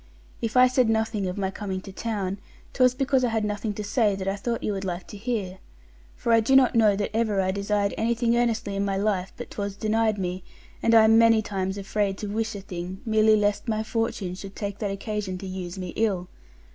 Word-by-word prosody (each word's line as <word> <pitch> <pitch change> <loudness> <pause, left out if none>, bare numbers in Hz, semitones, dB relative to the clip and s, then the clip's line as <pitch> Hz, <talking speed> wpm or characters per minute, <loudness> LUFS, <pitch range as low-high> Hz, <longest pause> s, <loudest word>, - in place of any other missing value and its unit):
If 230 +2 -1
I 250 - +8
said 250 -2 +2
nothing 220 -3 0
of 180 - -4
my 190 -1 -1
coming 195 -1 -4
to 195 - -10
town, 200 -2 -3 0.3
'twas 255 -1 +4
because 265 -1 +1
I 245 - +2
had 220 -1 0
nothing 210 +1 -2
to 210 - -4
say 210 -1 +2
that 190 0 -5
I 195 - 0
thought 230 +3 -3
you 210 - 0
would 195 -1 -4
like 180 -1 -4
to - - -9
hear. 205 -4 -3 0.6
For 235 - -1
I 230 - +6
do 230 +5 +2
not 265 -2 +6
know 215 -3 +4
that 205 +1 -3
ever 220 -3 +1
I 190 0 +1
desired 200 +1 0
anything 235 +1 +1
earnestly 230 -4 0
in 200 - 0
my 195 -1 -1
life, 195 -2 0
but - - -8
'twas 200 -1 -4
denied 220 +1 +1
me, 180 -1 -3 0.4
and 230 - +4
I 225 - +8
am 225 +1 +6
many 225 -1 +5
times 190 -1 -3
afraid 195 0 -1
to 210 - -5
wish 220 +1 -2
a 200 - -6
thing 185 0 -6
merely 220 -1 +4
lest 205 +2 0
my 220 -1 0
Fortune 220 -4 -2
should 195 +1 -9
take 200 -1 -4
that 205 - -1
occasion 195 -1 -3
to 195 - -8
use 185 -1 -6
me 185 -1 -5
ill. 190 -3 -1
210 Hz, 230 wpm, -25 LUFS, 195-225 Hz, 0.6 s, I